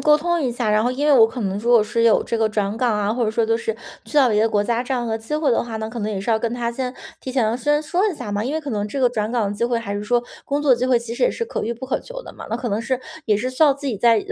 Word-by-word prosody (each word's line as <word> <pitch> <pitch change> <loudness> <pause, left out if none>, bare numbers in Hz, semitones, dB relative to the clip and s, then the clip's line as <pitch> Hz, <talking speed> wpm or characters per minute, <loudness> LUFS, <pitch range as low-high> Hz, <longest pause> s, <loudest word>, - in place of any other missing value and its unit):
沟 300 0 +5
通 345 +2 0
一 260 -5 0
下。 240 -3 -1
然 215 0 +3
后 - - +2
因 285 +3 -2
为 300 - +5
我 230 -4 +7
可 240 +2 -7
能 195 -2 -2
如 230 +3 -4
果 235 -3 +6
是 230 +2 0
有 225 - +5
这 230 - -2
个 220 -1 +2
转 210 0 -1
岗 235 -2 +1
啊， 210 +1 0
或 240 0 0
者 215 - 0
说 225 +1 +1
就 225 +1 +1
是 225 -1 -3 0.3
去 - - -13
到 265 -4 +6
别 210 -1 +2
的 225 - +3
国 205 -1 +1
家 235 +2 0
这 255 +1 -2
样 245 -1 -1
的 225 -1 -2
机 225 +7 -5
会 305 -3 +1
的 235 - +2
话， 230 -2 -5
那 220 - -4
可 235 +1 -7
能 210 - -2
也 205 -3 -3
是 200 - -2
要 220 - +3
跟 235 +1 -2
他 235 -1 -2
先 250 +1 -4 0.3
提 260 - -6
前 235 -2 +1
先 295 +2 +1
说 360 +7 +1
一 385 - -3
下 210 - -6
嘛， 205 +1 -1
因 275 +5 -2
为 315 - -1
可 285 - -6
能 210 -2 -1
这 270 +6 -4
个 250 -2 +4
转 215 -1 -2
岗 225 -5 +1
的 205 - -4
机 235 - 0
会 240 0 0
还 200 -3 -5
是 205 +1 -4
说 240 +2 +1 0.2
工 285 +1 -1
作 275 -3 +5
机 250 +2 -1
会 255 - +4
其 235 0 -3
实 240 - +1
也 - - +3
是 465 - -3
可 - - -4
遇 235 +2 -2
不 255 +3 -8
可 260 - -1
求 - - -9
的 - - -11
嘛， - - -10
那 225 - -1
可 245 -1 -4
能 210 +2 -1
是 260 +2 -2 0.2
也 210 -3 +2
是 250 +5 -2
需 255 +5 +3
要 285 -3 +5
自 285 +1 -12
己 235 - -2
在 230 +2 +4
235 Hz, 395 characters per minute, -21 LUFS, 220-260 Hz, 0.3 s, 我